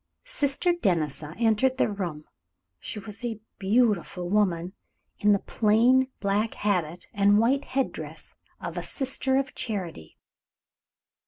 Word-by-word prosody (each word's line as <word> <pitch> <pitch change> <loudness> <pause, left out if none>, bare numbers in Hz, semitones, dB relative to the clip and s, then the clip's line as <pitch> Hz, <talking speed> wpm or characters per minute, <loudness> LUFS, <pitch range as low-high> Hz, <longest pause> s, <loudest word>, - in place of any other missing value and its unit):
Sister 350 - +1
Denisa 160 - -1
entered 235 +3 +3
the - - +3
room. 175 -7 -4 0.5
She - - -6
was 210 +3 -6
a 230 -3 -3 0.2
beautiful 200 -4 +1
woman, 185 -4 +1 0.5
in 210 - +4
the 200 - +5
plain 235 +6 +3
black 205 +2 0
habit 180 -5 -1
and 205 0 +4
white 260 +6 +2
head 265 0 0
dress - - -8 0.3
of - - -4
a - - -3
sister 265 -1 0
of 270 0 -1
charity. 180 - -5
210 Hz, 130 wpm, -27 LUFS, 185-255 Hz, 0.5 s, the